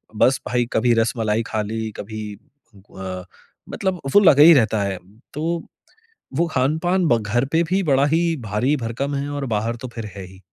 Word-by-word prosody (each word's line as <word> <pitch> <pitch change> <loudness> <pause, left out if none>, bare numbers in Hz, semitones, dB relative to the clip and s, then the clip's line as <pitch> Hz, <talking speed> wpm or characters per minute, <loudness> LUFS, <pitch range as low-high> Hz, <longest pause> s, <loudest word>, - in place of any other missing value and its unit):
बस 125 +3 +3
भाई 120 0 +1
कभी 120 +1 +3
रसमलाई 115 -1 0
खा 110 -1 -2
ली, 110 +1 -4
कभी 105 -1 -7 0.5
ग - - -19 0.3
अ, - - -39 0.4
मतलब 190 -2 -2
वो - - +8
लगा 150 -8 +6
ही 170 +2 +9
रहता 110 -6 +2
है। 100 -1 -2 0.4
तो 150 - -5 1.0
वो 170 - +3
खान-पान 160 +8 +1
ब 120 - +4
घर 115 +5 0
पे 165 - +3
भी 185 +4 0
बड़ा 140 -4 +3
ही 165 - +4 0.2
भारी-भरकम 125 +4 -1
है 140 +1 -3
और 145 -1 -3
बाहर 110 +3 -1
तो - - -3
फिर 115 -2 -5
है 100 - -7
ही। 95 +1 -15
120 Hz, 180 wpm, -21 LUFS, 110-145 Hz, 1.0 s, ही